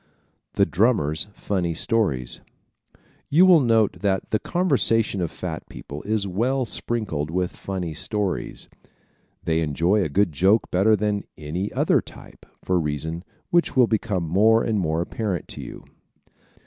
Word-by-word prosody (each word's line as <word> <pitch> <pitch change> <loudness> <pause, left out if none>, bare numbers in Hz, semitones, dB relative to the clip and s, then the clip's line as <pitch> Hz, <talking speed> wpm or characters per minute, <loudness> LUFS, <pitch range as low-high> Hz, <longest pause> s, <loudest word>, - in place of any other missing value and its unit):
The - - +3
Drummers' 95 - +1
Funny 90 -5 -2
Stories 75 - 0 0.6
¶ - - -37 0.3
You 170 +6 +6
will 180 -3 +7
note 115 -5 +2
that 95 -2 -1
the 110 - +2
conversation 130 - +1
of 85 - -1
fat 80 -2 -6
people 70 +1 -8
is 105 0 -1
well 120 +8 0
sprinkled 105 -11 -2
with 90 +1 -2
funny 90 -4 -4
stories. 100 +4 -3 0.8
They 80 0 +1
enjoy 85 +7 +1
a 85 - -1
good 95 +4 +2
joke 95 +9 +2
better 100 +4 +4
than 105 0 -1
any 85 +6 -4
other - - +2
type, - - -14 0.2
for 90 - +1
a - - +3
reason 80 +2 -3 0.3
which 175 -3 +2
will 130 -2 +6
become 105 -5 -1
more 110 +7 +4
and 110 -2 0
more 80 -2 0
apparent 95 -3 -3
to - - -7
you. - - -10
100 Hz, 150 wpm, -23 LUFS, 85-110 Hz, 0.8 s, will